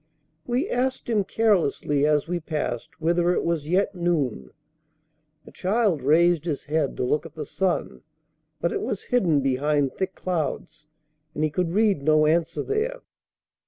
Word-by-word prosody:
We 250 +8 0
asked 255 -3 -1
him 210 -3 +2
carelessly 170 -9 +1
as 150 0 +2
we 175 +1 -1
passed 150 -7 -3
whether 170 +2 +2
it - - 0
was 165 -3 -1
yet 190 +5 +1
noon. 150 - -1 1.0
The - - -13
child 195 -4 +1
raised 165 +3 +3
his 155 -5 -3
head 150 -2 -1
to - - -1
look 150 +5 +1
at 165 -2 -12
the 155 -2 -5
sun, 185 +4 -2 0.6
but 170 - 0
it - - -2
was 200 - -3
hidden 175 - +2
behind 140 +1 +1
thick 190 0 -3
clouds, 160 -3 -4 0.5
and 150 - -1
he 155 - +1
could 170 +2 -1
read 205 -6 +2
no 155 +1 +4
answer 160 +2 +1
there. 455 +4 -2
165 Hz, 160 wpm, -25 LUFS, 150-190 Hz, 1.0 s, no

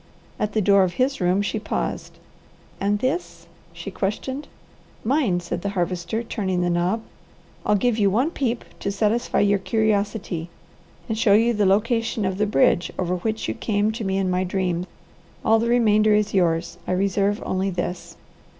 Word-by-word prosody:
At 210 -1 -1
the 215 - +1
door 200 0 +5
of 185 -2 +1
his 260 -2 0
room 180 +3 +2
she 215 - -2
paused. 215 - -4 0.6
"And 205 +1 +1
this?" 175 -7 -3 0.3
she 170 +3 -8
questioned. 235 +9 -3 0.6
"Mine," 225 - +1
said 175 0 -4
the 200 - -2
Harvester, 180 +5 -1
turning 190 -5 -2
the 175 0 +1
knob. 180 +6 0 0.6
"I'll 210 - +4
give 230 +2 +1
you 200 -1 +4
one 250 - +1
peep 245 -7 -2
to 200 - -2
satisfy 220 +4 +1
your 205 -1 +3
curiosity, 205 -5 -1 0.6
and 220 -2 -2
show 210 -3 +4
you 230 +3 +4
the 210 -3 +2
location 225 +2 +1
of 190 +1 -2
the 210 - +2
bridge 175 -1 +3
over 180 0 -1
which 220 +4 -2
you - - -1
came 210 -1 0
to 225 +1 -5
me 195 -1 0
in 190 -1 0
my 180 +1 +1
dream. 180 -1 -1 0.6
All 225 0 +5
the 230 +1 0
remainder 215 -3 +4
is 210 0 +1
yours. 175 -2 +1
I - - 0
reserve 200 +2 +1
only 190 +1 0
this." 180 -1 -4
200 Hz, 175 wpm, -23 LUFS, 180-220 Hz, 0.6 s, door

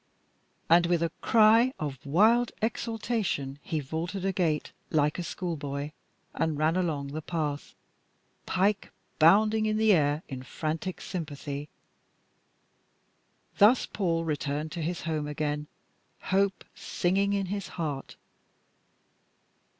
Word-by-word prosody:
And 170 +1 +5
with 170 -1 +2
a 165 - 0
cry 225 +3 +5
of 140 -4 -5
wild 225 +10 +4
exaltation 220 - -2
he 155 - -2
vaulted 165 +7 -4
a 195 - +2
gate 160 -5 0 0.2
like 150 +1 +1
a - - -2
schoolboy 145 -5 -4 0.4
and 160 -2 -1
ran 155 +2 +2
along 155 -6 -1
the 155 +3 -5
path, 150 -3 -3 0.7
Pike 195 +2 +1 0.3
bounding 215 +7 +5
in 215 0 +1
the 220 -1 +5
air 150 -1 +2
in 130 -2 -6
frantic 160 +7 -4
sympathy. 145 -4 -5 1.9
Thus 220 +5 +6
Paul 165 -4 -1
returned 150 0 -2
to 170 - -4
his 170 +2 -2
home 155 -3 -2
again, 150 0 -2 0.5
hope 195 +1 0
singing 195 +3 0
in 200 -1 0
his 200 -4 -4
heart. 150 -5 -4
165 Hz, 120 wpm, -28 LUFS, 150-195 Hz, 1.9 s, Thus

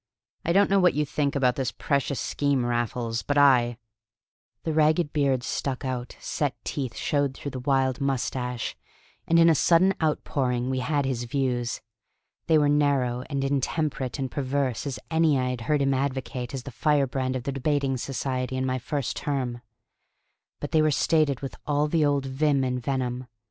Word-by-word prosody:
I 170 - 0
don't 195 +2 +4
know 200 - +5
what 180 -2 +4
you 150 0 +1
think 145 0 -1
about 125 -3 +2
this 130 -3 -1
precious 140 -1 -1
scheme 140 -4 0
Raffles, 120 -1 -1
but 145 - -1
I..." 125 -4 +5 0.9
The 160 - -1
ragged 155 0 +2
beard 135 -4 +1
stuck 135 +2 -3
out, 125 -1 -4
set 145 -5 -2
teeth 130 -5 -4
showed 140 -2 0
through 140 - -6
the 130 - -5
wild 135 0 +1
moustache, 125 -2 -2 0.5
and 165 - +4
in 165 0 +7
a 165 - +6
sudden 170 +5 +4
outpouring 130 -5 0
we 130 - -1
had 140 +2 0
his 125 -2 -2
views. 120 -2 -1 0.7
They 160 - +5
were 150 -1 +3
narrow 140 -4 +2
and 140 -2 -1
intemperate 140 -1 -1
and 135 -3 -3
perverse 135 -2 -1
as 135 - -3
any 160 -3 +3
I 125 -1 0
had 125 -2 -5
heard 145 +4 +1
him 135 0 +2
advocate 130 -1 -3
as 130 - -5
the 135 - -8
firebrand 135 -1 +1
of 125 - -3
the 140 - -2
Debating 135 0 0
Society 130 0 -3
in 130 - 0
my 130 0 -1
first 140 +1 -3
term. 125 -4 -2 1.0
But 145 - -5
they 160 -2 +4
were 155 - +3
stated 150 -2 +2
with 135 - -5
all 145 0 +2
the 155 0 +2
old 145 -2 +1
vim 140 +1 +1
and 125 -1 -1
venom. 125 -1 -2
135 Hz, 180 wpm, -26 LUFS, 125-145 Hz, 1.0 s, in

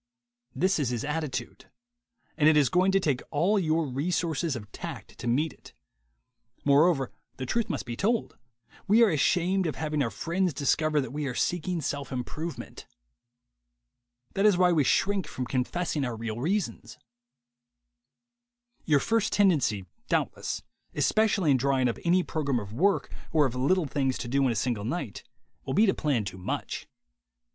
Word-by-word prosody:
This 185 -1 +2
is 140 -5 0
his 120 0 -2
attitude; 150 -3 -4 0.7
and 155 -1 +5
it 155 - +4
is 140 -4 +4
going 185 +5 +3
to 195 - +3
take 145 -9 0
all 185 +8 +2
your 160 -2 +1
resources 160 +2 -1
of 105 -3 -8
tact - - -8
to - - -5
meet 140 +5 +1
it. - - -17 0.9
Moreover, 145 -1 +4 0.3
the 130 - -4
truth 230 - -1
must 140 - -3
be 120 - -5
told: 220 - 0 0.5
we 220 +4 +6
are 220 - +4
ashamed 180 +4 +2
of 155 - -3
having 150 -2 -1
our 120 - +1
friends 170 +3 -1
discover 155 +2 +1
that 130 -1 -6
we 150 -1 -2
are 125 - -4
seeking 175 +2 -1
self 140 -1 -3
im 125 -1 -2
provement. 160 +6 -7 1.5
That 195 +2 +3
is 200 -4 +4
why 180 -1 +4
we 155 -4 +3
shrink 195 +4 +1
from 130 - -4
confessing 145 +5 -1
our 120 -3 -2
real 110 -1 -4
reasons. 130 - -2 1.9
Your 150 -3 +4
first 225 +5 +1
tendency, 145 - +2 0.2
doubtless, - - -1 0.3
especially 205 -7 +2
in 135 - +5
drawing 130 0 +2
up 115 - -2
any 180 +1 +3
program 140 -7 -1
of 105 -1 -8
work 195 - +1 0.2
or 155 -3 +4
of 130 - -1
little 160 +8 +2
things 135 -2 -1
to - - -5
do 135 +3 +1
in - - +1
a - - -2
single 110 -1 -1
night, 120 - -4 0.4
will 135 - -3
be 220 - +5
to 190 - +3
plan 135 -9 0
too 95 -1 -6
much. 90 - -4
150 Hz, 170 wpm, -28 LUFS, 130-180 Hz, 1.9 s, we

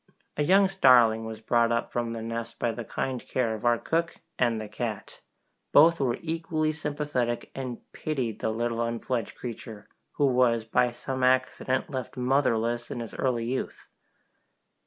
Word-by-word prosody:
A - - -1
young 195 +6 +5
starling 125 -11 +5
was 110 -1 -7
brought 115 +1 +2
up 115 0 -1
from 120 -1 -2
the 115 -1 -5
nest 115 0 -5
by 120 - 0
the 115 +1 -6
kind 130 +3 -3
care 120 -4 -1
of 110 - -7
our 120 -1 +4
cook 165 +6 -1 0.2
and 120 -3 +2
the 110 - -5
cat! 110 0 -5 0.5
Both 165 +3 +7
were 130 -4 +1
equally 160 -1 -1
sympathetic, 145 -6 -2
and 130 -3 -5
pitied 130 -8 -3
the - - -1
little 115 +1 -1
unfledged 115 0 -2
creature, 115 -3 -8 0.3
who 145 - +2
was 125 -4 +3
by 125 +2 +2
some 130 +2 -5
accident 130 +2 +1
left 130 -2 -5
motherless 120 -2 +1
in - - -4
his 115 -2 -6
early 120 -3 0
youth. 130 +3 -4
120 Hz, 160 wpm, -27 LUFS, 115-135 Hz, 0.5 s, Both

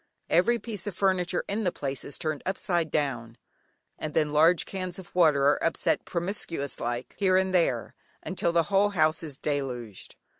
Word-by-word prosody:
Every 220 +9 +4
piece 215 -5 -6
of 200 - -4
furniture 185 -2 +1
in 210 +3 -1
the 180 - +1
place 135 -4 -4
is 140 - -7
turned 155 -2 -3
upside 175 -3 -1
down, 120 -7 -2 0.6
and 155 -1 -5
then 150 -2 +2
large 160 +4 +4
cans 185 -2 -5
of 190 -2 -12
water 155 -6 +4
are 145 - +3
upset 165 - +1
"promiscuous 170 -5 -3
like" 120 +1 -3
here 185 -2 +4
and 190 0 +1
there, 135 - +1 0.3
until 170 - -1
the 170 -1 +3
whole 200 +1 +5
house 155 -4 +2
is 150 -5 -6
deluged. 125 -9 -4
165 Hz, 175 wpm, -27 LUFS, 145-185 Hz, 0.6 s, whole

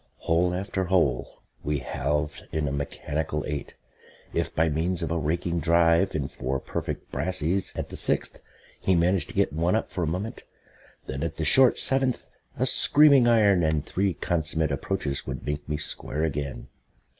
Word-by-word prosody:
Hole 85 +2 +1
after 95 0 -2
hole 90 0 0 0.2
we 75 0 -1
halved 75 +2 -3
in 80 -2 -1
a - - -2
mechanical 75 +2 -3
eight. 75 -1 -5 0.6
If - - -2
by 80 +1 +3
means 85 +3 -1
of 80 - -3
a 85 - 0
raking 85 +3 -1
drive 85 +3 +3
and 70 -3 -2
four 65 +1 -3
perfect - - -5
brassies 90 +1 0
at - - -4
the - - -7
sixth - - 0 0.4
he 95 - +2
managed 90 +2 +2
to - - -10
get - - +1
one 85 +5 +1
up 110 - -2
for 90 - -3
a - - 0
moment, 95 +8 -4 0.6
then 70 +1 -5
at 80 -1 -3
the 80 - -3
short 130 +10 +7
seventh 135 -1 +2 0.3
a - - +1
screaming 145 -4 +5
iron 105 -6 +4
and 80 -2 0
three 95 -2 -1
consummate 80 0 -1
approaches 70 0 -3
would 65 0 -5
make 75 +1 -4
me 75 - -1
square 75 +1 -4
again. 70 -3 -3
80 Hz, 170 wpm, -26 LUFS, 75-95 Hz, 0.6 s, short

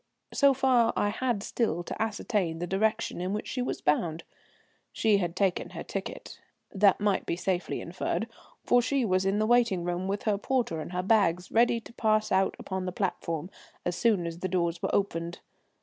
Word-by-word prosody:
So 280 -1 +5
far 255 -3 +3
I 205 - +1
had 225 -1 -1
still 195 -9 -1
to - - -6
ascertain 205 -6 -1
the 175 - -3
direction 215 +1 0
in 185 +2 -2
which 210 - -3
she 255 - -3
was 250 - -3
bound. 160 +2 0 0.7
She 215 -2 +3
had 175 -3 -2
taken 190 -2 0
her - - -7
ticket. - - -6 0.3
That 200 -1 +4
might 205 -2 0
be - - 0
safely 180 0 -2
inferred, - - -2 0.4
for 245 - +4
she 260 +1 +1
was 185 -2 +1
in 195 +1 +1
the 215 - +2
waiting 230 -6 +3
room 175 +2 -2
with 200 +1 -2
her 205 -2 +1
porter 230 -10 -1
and 155 - -7
her 180 0 -2
bags, 185 -4 +2
ready 235 0 +3
to 235 - -14
pass 215 -2 +1
out 190 0 +2
upon 190 -1 -4
the - - -1
platform 175 -2 -3 0.3
as 175 - -1
soon 210 -6 +2
as 170 0 -5
the 185 - -2
doors 170 -2 -1
were - - -1
opened. 170 -4 -1
195 Hz, 195 wpm, -28 LUFS, 175-225 Hz, 0.7 s, So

